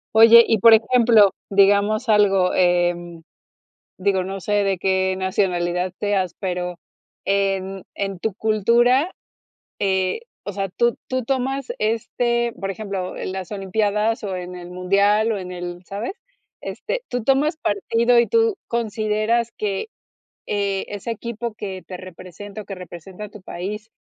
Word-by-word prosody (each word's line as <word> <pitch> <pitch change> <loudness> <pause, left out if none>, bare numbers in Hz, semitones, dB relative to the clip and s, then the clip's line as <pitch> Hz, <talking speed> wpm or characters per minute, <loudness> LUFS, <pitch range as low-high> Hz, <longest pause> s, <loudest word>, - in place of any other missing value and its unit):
Oye, 230 +1 +9
y, 225 - +2
por 225 +3 +7
ejemplo, 225 -3 +5 0.2
digamos 200 +3 +3
algo, 195 -3 +4
eh, 175 -1 +3 1.1
digo, 190 0 +1
no 195 +1 -5
sé 200 +4 -3
de 195 -2 0
qué 190 0 +1
nacionalidad 180 -2 0
seas, 195 -4 0
pero 180 -2 -3 0.5
en 195 -1 0
en 195 -2 -3
tu 220 - -1
cultura, 235 - +3 0.7
eh, 190 - 0 0.2
o 205 - -4
sea, 195 0 -3
tú 235 +6 +1
tú 255 -1 -1
tomas 270 +1 -1
este, 235 +2 0
por 195 0 -2
ejemplo, 195 -2 -4
las 185 0 -5
olimpiadas, 210 +3 0
o, 195 -2 -3
en 180 0 -6
el 175 0 -9
mundial, 200 +4 +2
o, - - -2
en 185 -1 -6
el 175 0 -7
¿sabes? 205 - -4 0.5
Este, - - -4
tú 245 -2 -3
tomas 275 +6 +2
partido, 230 +1 +1
y 235 - +4
tú 455 -2 +2
consideras 220 0 0
que, 205 - -3 0.6
eh, 200 -2 -1
ese 205 +3 -5
equipo 235 +1 -5
que 190 -4 -6
te 180 - -7
representa, 185 +3 -10
o, - - -24
que 200 - -7
representa 185 +2 -9
tu 210 -2 -13
país, 210 +5 -6
200 Hz, 140 wpm, -22 LUFS, 185-225 Hz, 1.1 s, Oye